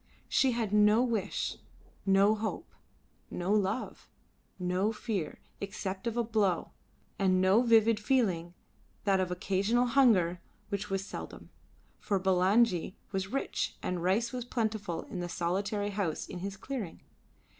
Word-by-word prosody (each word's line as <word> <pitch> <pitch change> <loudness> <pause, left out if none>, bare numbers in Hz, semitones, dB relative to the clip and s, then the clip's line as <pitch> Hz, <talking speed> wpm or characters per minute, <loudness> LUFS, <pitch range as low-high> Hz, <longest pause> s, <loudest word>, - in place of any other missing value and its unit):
She 265 -2 +3
had 225 -3 -2
no 210 +3 +5
wish, 230 -6 -1 0.5
no 195 +2 +5
hope, 220 0 -4 0.6
no 180 +3 -1
love, 210 +3 -1 0.5
no 185 +3 0
fear 210 -7 -3 0.2
except 200 +1 -4
of 235 0 -2
a 235 - +2
blow, 210 -6 0 0.5
and 185 -2 +3
no 190 +5 +5
vivid 230 -2 +4
feeling 190 -8 +1 0.5
but 195 -2 +3
that - - -1
of 185 - -1
occasional 195 +7 +1
hunger, 215 -10 +4 0.3
which 200 0 -3
was 195 0 -1
seldom, - - -8 0.5
for 200 -2 0
Bulangi 190 0 +3 0.2
was 190 -1 -2
rich 270 +7 -2
and 180 -1 -2
rice 205 +7 +1
was 250 -1 -3
plentiful 220 -8 -2
in 185 - -7
the 175 0 -3
solitary 200 +5 -1
house 195 -6 -2
in 180 - -7
his 195 +1 -5
clearing. 225 -6 -5
200 Hz, 140 wpm, -31 LUFS, 185-225 Hz, 0.6 s, no